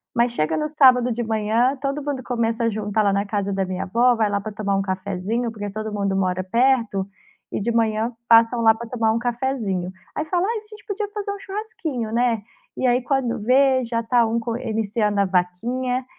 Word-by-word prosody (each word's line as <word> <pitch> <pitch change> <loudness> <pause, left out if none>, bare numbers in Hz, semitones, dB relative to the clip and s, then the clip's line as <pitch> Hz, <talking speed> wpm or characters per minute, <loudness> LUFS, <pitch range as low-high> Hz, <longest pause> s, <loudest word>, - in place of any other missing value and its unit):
mas 235 0 +3
chega 160 -8 0
no 305 - -1
sábado 255 -5 +5
de 240 +1 -2
manhã, 225 +4 +1
todo 275 +1 -2
mundo 285 -3 -3
começa 230 -1 -1
a - - +3
juntar 215 0 -1
lá 200 - +3
na 200 +1 0
casa 200 -1 -2
da 195 -1 0
minha 185 0 -3
avó, 240 +5 +3
vai 220 -2 +1
lá 200 0 0
para 215 - -6
tomar 200 -1 -1
um 195 - +1
cafezinho, 195 +5 -2
porque 205 -2 -5
todo 215 +1 -5
mundo 200 -1 -1
mora 185 -1 0
perto, 230 -2 +1 0.4
e - - -2
de 235 +4 -1
manhã 225 0 +1 0.2
passam 230 +1 +5
lá 225 -1 +5
para 235 +1 -8
tomar 225 -3 +1
um 225 - 0
cafezinho. 235 -7 -2 0.2
Aí 300 - -2
fala: 350 +3 0
"Ai 460 +1 -1
a 425 - -20
gente 425 -1 -14
podia 415 +1 -3
fazer 410 -1 -3
um 400 - -6
churrasquinho, 365 - -5
né". 235 -2 +1 0.4
E - - -1
aí 250 0 +3
quando 250 -3 -1
vê 260 +3 +4
já 230 0 -2
tá 240 +1 +3
um 230 +1 0
co 230 0 -3
iniciando 215 -2 -1
a - - +3
vaquinha, 240 +8 -1
230 Hz, 215 wpm, -22 LUFS, 205-255 Hz, 0.4 s, sábado